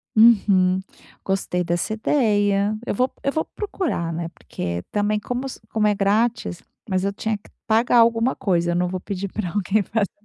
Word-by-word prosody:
Uhum. 195 -5 +5 0.4
Gostei 190 -2 0
dessa 175 +4 -1
ideia. 210 -4 +2
Eu - - -1
vou 250 +5 +1
eu 275 - +1
vou 315 - -1
procurar, 340 - -3
né? 165 0 -3
Porque 85 - -5
também, 210 0 +1
como 250 +5 -3
se - - -9
como 215 -1 +1
é 210 - +2
grátis 205 -1 0 0.3
mas 190 -2 0
eu 200 - 0
tinha 220 +1 -2
que 205 - -20 0.2
pagar 230 +2 +4
alguma 230 +2 +3
coisa. 175 -3 +1
Eu - - 0
não 180 0 +1
vou 185 0 -3
pedir 195 +1 -4
para 215 -4 -3
alguém 205 +3 +1
fazer 205 0 -1
205 Hz, 180 wpm, -22 LUFS, 185-225 Hz, 0.4 s, Uhum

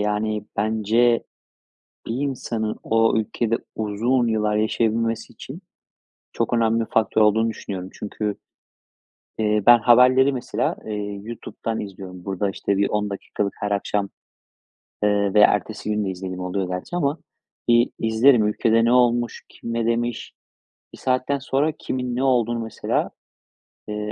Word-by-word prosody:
Yani, 105 0 -1
bence, 110 +3 +2 0.8
bir 115 - -3
insanın 120 -5 -2
o 115 0 +2
ülkede 115 +1 0 0.2
uzun 115 +4 0
yıllar 105 -1 +1
yaşayabilmesi 115 +1 0
için 155 +9 -10 0.7
çok - - -1
önemli 115 -1 +2
faktör 110 0 +2
olduğunu 110 +2 +4
düşünüyorum. 95 -4 -6
Çünkü, 105 0 -4 1.0
eee, 105 -1 +1
ben, 120 -1 +8
haberleri, 130 +3 +5
mesela, 125 - -2
eee, 105 -2 -4
YouTube'dan 115 0 -5
izliyorum. 95 -3 -8
Burada, 100 +1 -1
işte, 100 0 -1
bir 100 0 +2
10 105 -1 -1
dakikalık 100 0 -3
her 105 0 -2
akşam, 100 0 -1 0.9
eee, 100 -1 +2
ve 105 - +6
ertesi 105 +1 +2
gün 105 -1 0
de 95 - -2
izlediğim 90 0 -6
oluyor 90 0 -2
gerçi 90 - -4
ama. 150 -1 0 0.5
İii, 120 +1 +4
izlerim 115 0 +4
ülkede 115 +2 +2
ne 120 - +3
olmuş? 120 -1 +2
Kim 115 - -8
ne 115 -1 0
demiş? 120 0 -1 0.6
Bir - - -11
saatten 130 +2 0
sonra 140 +3 0
kimin 125 -4 -4
ne 130 - -1
olduğunu 120 -3 +2
mesela, 110 -1 -2 0.8
eee, 105 0 -4
110 Hz, 135 wpm, -23 LUFS, 105-120 Hz, 1.0 s, ben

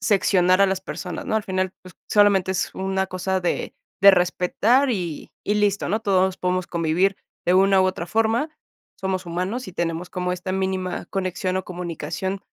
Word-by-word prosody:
seccionar 190 -4 +3
a 200 - +6
las 190 -1 -1
personas, 180 -1 -6
¿no? 220 - +1
Al 215 - -1
final, 185 0 -1
pues, 185 -2 -13 0.2
solamente 200 -3 +4
es 190 - -2
una 190 0 -1
cosa 190 +1 -1
de 175 - -2 0.3
de 200 - +11
respetar 190 +9 +2
y 175 -9 -4
y 205 - +1
listo, 205 -1 +1
¿no? 215 +5 0
Todos 190 -3 +2
podemos 180 0 -1
convivir 170 +3 +1 0.3
de 175 - +4
una 195 0 +5
u - - +4
otra 185 -2 -1
forma. 225 - +1 0.5
Somos 190 -1 -2
humanos 185 +8 -3
y - - -9
tenemos 170 0 -3
como 180 0 -2
esta 180 +1 -4
mínima 190 -1 -2
conexión 185 -1 -2
o 190 - -2
comunicación, 180 +2 -4
190 Hz, 175 wpm, -23 LUFS, 180-195 Hz, 0.5 s, de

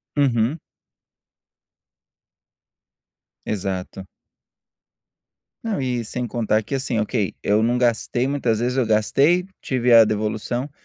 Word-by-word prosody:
Uhum. 135 +1 +1 2.8
Exato. 95 -2 -4 1.6
Não 215 -9 -2
e 125 -2 -1
sem 125 +2 -4
contar 110 -2 0
que, 135 - -4
assim, 130 -4 -1
ok, 105 -2 -1
eu 105 +2 +2
não 120 +2 +1
gastei 120 +1 0
muitas 125 -6 0
vezes, 125 +2 -1
eu 130 - +2
gastei, 140 - +2
tive 125 -2 +1
a 115 -1 +9
devolução, 110 +5 -2
120 Hz, 105 wpm, -22 LUFS, 110-130 Hz, 2.8 s, a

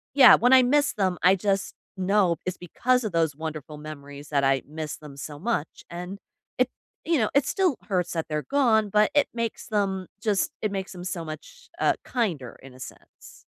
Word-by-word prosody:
yeah, 265 -3 +10
when 245 +2 +3
I 260 -1 +8
miss 285 +3 +3
them, 185 -3 0
I 185 +2 +6
just 195 0 -1 0.2
know 190 -2 +2
it's 185 - -3
because 250 +8 0
of 215 - -2
those 165 -3 +1
wonderful 155 -1 -6
memories 145 -1 -10
that 140 -2 +1
I 135 0 +3
miss 155 0 -5
them 150 -2 -12
so 145 +1 -7
much 195 -5 -3
and 180 +3 -6 0.4
it, 255 0 +2 0.4
you 330 -1 +2
know, 215 - +1
it 280 -1 +4
still 365 -6 +1
hurts 180 -3 -1
that 165 -2 -2
they're 150 -1 -2
gone, 230 -7 +3
but 210 +1 +3
it 290 -1 +4
makes 230 -1 -3
them 195 -3 -1
just 210 -3 +1
it 215 - 0
makes 190 -1 -4
them 180 -2 -8
so 175 -2 -4
much, 155 - -10
uh, - - +3
kinder 170 - -2
in 135 -1 -12
a 130 - -15
sense. 130 - -13
185 Hz, 200 wpm, -26 LUFS, 155-225 Hz, 0.4 s, yeah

